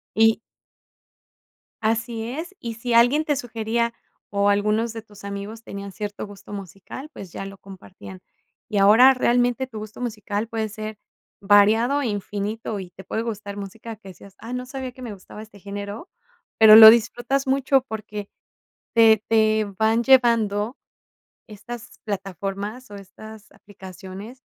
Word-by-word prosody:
y 225 +1 +4 1.4
así 225 +1 -1
es, 325 +9 -6
y 230 -1 -6
si 235 +1 -4
alguien 245 +7 +4
te 295 -2 0
sugería, 235 -1 -2 0.4
o 200 0 +1
algunos 210 +3 +1
de 225 - -6
tus 205 -2 -16
amigos 200 +3 -6
tenían 200 -2 -8
cierto 205 0 -6
gusto 205 0 -13
musical, 200 - -8
pues, 185 -4 -10
ya 195 - -6
lo 195 0 -9
compartían. 190 -1 -12 0.5
Y 215 - -3
ahora 225 +7 +7
realmente 245 +1 +1
tu 230 -4 -9
gusto 215 +1 -9
musical 215 -2 -3
puede 220 -2 -2
ser 215 0 -7 0.4
variado 215 +7 +4
e 260 - -1
infinito 205 +1 -4
y 180 - -9
te 190 +1 -13
puede 220 - -3
gustar 205 -3 -6
música 215 +3 -8
que 200 -2 -15
decías, 190 +1 -14
ah, 230 - -9
no 250 0 -4
sabía 260 -1 -6
que 255 - -15
me 235 -4 -6
gustaba 200 +2 -12
este 215 -2 -15
género, 200 - -7 0.5
pero, 220 -1 +9
lo 220 0 +13
disfrutas 240 +4 +1
mucho 270 0 +2
porque, 210 -2 -6 0.7
te 220 -2 +5
te 220 -1 +3
van 225 +2 +2
llevando 230 -3 +3 0.7
estas 235 +2 -10
plataformas, 200 +4 -5
o - - -9
estas 210 +2 -13
aplicaciones 195 +5 -11
220 Hz, 150 wpm, -23 LUFS, 200-235 Hz, 1.4 s, lo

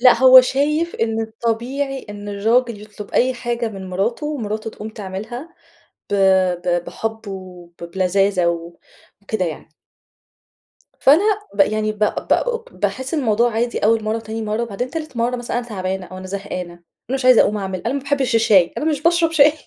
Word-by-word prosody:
لأ 250 0 +8
هو 260 0 +10
شايف 300 +6 0
إن 225 0 -1
الطبيعي 235 +5 -3
إن 205 0 -8
الراجل 225 +2 +1
يطلب 210 -1 -10
أي 255 +1 +2
حاجة 240 -1 -2
من 190 -3 -8
مراته، 220 +10 -1
ومراته 220 -7 -3
تقوم 215 0 -8
تعملها 220 - -7 0.6
ب - - +2 0.5
ب 175 -1 0
بحب 225 -1 -5
وب 180 -3 -9 0.2
بلذاذه 190 -1 +2
و 170 0 -3 0.4
وكده 200 -2 -2
يعني. 160 -1 -6 1.3
فأنا 300 +8 +6 0.3
ب 200 - -2
يعني 215 +1 +2
ب 210 - -16
ب 470 - 0
باحسّ 260 +3 -2
الموضوع 240 -5 +2
عادي 235 +2 -1
أول 225 +1 +2
مرة 215 +1 0
وتاني 225 0 -5
مرة، 215 +2 -1
وبعدين 235 +3 -4
تالت 310 -6 -6
مرة 240 +2 0
مثلًا 240 0 -3
أنا 240 - -5
تعبانة 190 -3 -4
أو 185 +2 -9
أنا 185 - -8
زهقانة، 185 -2 -5
أنا 175 - -21 0.4
مش 255 - -5
عايزة 255 -2 +7
أقوم 210 - +3
أعمل 190 -2 -4
أنا 245 - 0
ما 280 - -1
باحبش 275 -3 0
الشاي، 200 -6 +4
أنا - - -3
مش 300 -3 0
باشرب 335 0 +3
شاي. 295 -2 +6
225 Hz, 175 wpm, -20 LUFS, 195-255 Hz, 1.3 s, هو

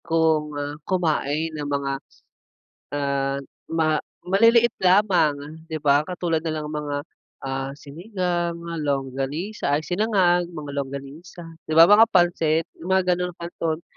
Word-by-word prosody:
kung 160 -2 +1 0.4
kumain 160 -3 0
ng 150 -2 -5
mga 140 -1 -1 1.0
ah, 140 -1 -1 0.8
maliliit 230 +5 +4
lamang, 185 -5 +4 0.3
'di 160 -2 -5
ba? 145 +1 +3
Katulad 175 -3 -1
na - - 0
lang 150 -1 -4
ng 150 - -4
mga, 145 -1 -3 0.5
ah, 135 0 -3
sinigang 175 +3 -3
nga, 170 0 -6
longganisa 140 +5 -2
ay, 150 - 0
sinangag, 180 -2 +2
mga 150 -4 -7
longganisa, 140 +6 -7 0.2
'di 155 - -2
ba? 165 +4 +8
Mga 220 +2 +8
pansit, 165 -3 +3
mga 190 +3 +1
ganong 180 0 -3
canton. 170 -1 -4
160 Hz, 125 wpm, -23 LUFS, 145-180 Hz, 1.0 s, ba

